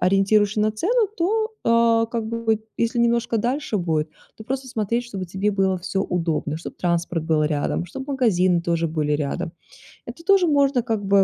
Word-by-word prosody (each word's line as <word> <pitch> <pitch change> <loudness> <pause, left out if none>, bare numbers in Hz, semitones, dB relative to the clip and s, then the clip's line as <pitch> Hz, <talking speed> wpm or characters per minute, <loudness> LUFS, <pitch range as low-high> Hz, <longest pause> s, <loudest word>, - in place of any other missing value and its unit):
ориентируешься 200 +2 +3
на 215 0 +2
цену, 425 - +1
то, 435 +5 0
а, 230 0 +3
как 230 -1 -3
бы, 225 -1 0 0.2
если 235 +1 0
немножко 235 0 +2
дальше 245 +1 -1
будет, 160 -4 0 0.3
то 220 - -11
просто 265 +1 -3
смотреть, 230 0 -1
чтобы 195 -6 -6
тебе 190 +4 -1
было 195 -2 +1
всё 185 +2 -3
удобно, 165 -3 -1
чтобы 165 - -8
транспорт 170 -2 -1
был 160 -2 +2
рядом, 150 +3 -1
чтобы 265 - -8
магазины 185 -9 +2
тоже 170 -1 0
были 155 -1 -1
рядом. 155 +4 -2 0.5
Это 255 +8 -9
тоже 390 -2 +5
можно 280 -4 +3
как 220 -4 -2
бы - - -5
215 Hz, 175 wpm, -23 LUFS, 175-240 Hz, 0.5 s, тоже